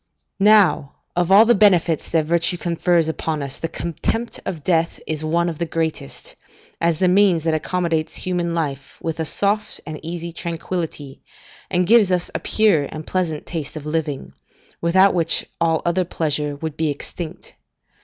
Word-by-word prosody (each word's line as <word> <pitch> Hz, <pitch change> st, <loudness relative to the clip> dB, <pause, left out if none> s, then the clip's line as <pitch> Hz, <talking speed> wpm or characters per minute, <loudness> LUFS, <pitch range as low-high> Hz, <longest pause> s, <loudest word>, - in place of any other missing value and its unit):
Now, 195 Hz, -8 st, +4 dB, 0.2 s
of 175 Hz, +1 st, +1 dB
all 205 Hz, +3 st, +8 dB
the 240 Hz, -, +5 dB
benefits 180 Hz, -6 st, +3 dB
that 160 Hz, -2 st, +1 dB
virtue 170 Hz, +2 st, +1 dB
confers 170 Hz, -1 st, +1 dB
upon 160 Hz, -2 st, -2 dB
us, 135 Hz, -1 st, -6 dB
the 165 Hz, -, -2 dB
contempt 170 Hz, +9 st, -3 dB
of 165 Hz, -6 st, -4 dB
death 165 Hz, -1 st, +1 dB
is 155 Hz, -1 st, -3 dB
one 170 Hz, +2 st, +1 dB
of 165 Hz, -3 st, -4 dB
the 170 Hz, -, 0 dB
greatest, 160 Hz, -, -4 dB, 0.5 s
as 170 Hz, -1 st, +2 dB
the 185 Hz, -, +2 dB
means 185 Hz, -3 st, +4 dB
that 160 Hz, -1 st, +1 dB
accommodates 165 Hz, -1 st, -1 dB
human 175 Hz, -2 st, -2 dB
life 140 Hz, -5 st, -3 dB
with 165 Hz, 0 st, -4 dB
a 160 Hz, -, 0 dB
soft 205 Hz, +6 st, -1 dB
and 155 Hz, -1 st, -6 dB
easy 170 Hz, +1 st, -5 dB
tranquillity, 165 Hz, -4 st, -5 dB, 0.5 s
and 180 Hz, -1 st, +1 dB
gives 215 Hz, -1 st, +5 dB
us 180 Hz, -1 st, 0 dB
a -, -, -1 dB
pure 200 Hz, -10 st, +2 dB
and 155 Hz, +2 st, -8 dB
pleasant 170 Hz, -5 st, -2 dB
taste 160 Hz, -4 st, -5 dB
of 150 Hz, -2 st, -7 dB
living, 150 Hz, -2 st, -3 dB, 0.5 s
without 190 Hz, +4 st, +4 dB
which 165 Hz, -2 st, +1 dB, 0.2 s
all 165 Hz, -1 st, +2 dB
other 175 Hz, +2 st, +2 dB
pleasure 150 Hz, -4 st, -1 dB
would 155 Hz, +1 st, -5 dB
be 155 Hz, -1 st, 0 dB
extinct. 160 Hz, +4 st, -7 dB
165 Hz, 165 wpm, -21 LUFS, 155-180 Hz, 0.5 s, all